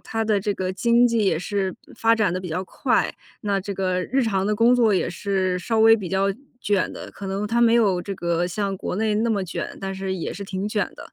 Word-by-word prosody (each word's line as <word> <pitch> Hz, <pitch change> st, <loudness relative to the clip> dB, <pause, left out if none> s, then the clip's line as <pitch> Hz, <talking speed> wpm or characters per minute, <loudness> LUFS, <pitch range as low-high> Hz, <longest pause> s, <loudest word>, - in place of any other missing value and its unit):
它 225 Hz, 0 st, -3 dB
的 215 Hz, -2 st, +2 dB
这 205 Hz, +1 st, -1 dB
个 185 Hz, -1 st, -2 dB
经 235 Hz, +5 st, +4 dB
济 230 Hz, -3 st, +1 dB
也 175 Hz, -5 st, +2 dB
是 190 Hz, +1 st, -2 dB, 0.2 s
发 225 Hz, 0 st, +3 dB
展 205 Hz, -6 st, +2 dB
得 185 Hz, -, -2 dB
比 180 Hz, -, -6 dB
较 180 Hz, +4 st, -3 dB
快， -, -, 0 dB, 0.3 s
那 200 Hz, -2 st, 0 dB
这 200 Hz, +2 st, -5 dB
个 185 Hz, -1 st, -1 dB
日 265 Hz, +8 st, 0 dB
常 195 Hz, -4 st, 0 dB
的 210 Hz, +1 st, 0 dB
工 235 Hz, +3 st, +5 dB
作 235 Hz, -4 st, +4 dB
也 190 Hz, -, +1 dB
是 185 Hz, 0 st, -1 dB
稍 225 Hz, +4 st, -1 dB
微 225 Hz, 0 st, +7 dB
比 195 Hz, -5 st, -5 dB
较 190 Hz, 0 st, +1 dB, 0.4 s
卷 205 Hz, -4 st, 0 dB
的， -, -, -8 dB
可 195 Hz, -, -7 dB
能 195 Hz, +2 st, -2 dB
它 235 Hz, +3 st, +1 dB
没 235 Hz, -1 st, +5 dB
有 200 Hz, -6 st, +3 dB
这 200 Hz, -, -5 dB
个 170 Hz, 0 st, 0 dB
像 195 Hz, +1 st, -2 dB
国 180 Hz, -, -4 dB
内 215 Hz, 0 st, +1 dB
那 225 Hz, +2 st, +1 dB
么 200 Hz, -4 st, 0 dB
卷， 175 Hz, -, -5 dB
但 195 Hz, 0 st, -4 dB
是 190 Hz, 0 st, -3 dB
也 170 Hz, -, -4 dB
是 200 Hz, -, -7 dB
挺 195 Hz, +1 st, -3 dB
卷 210 Hz, -1 st, -1 dB
的。 -, -, -12 dB
200 Hz, 270 characters per minute, -23 LUFS, 185-220 Hz, 0.4 s, 微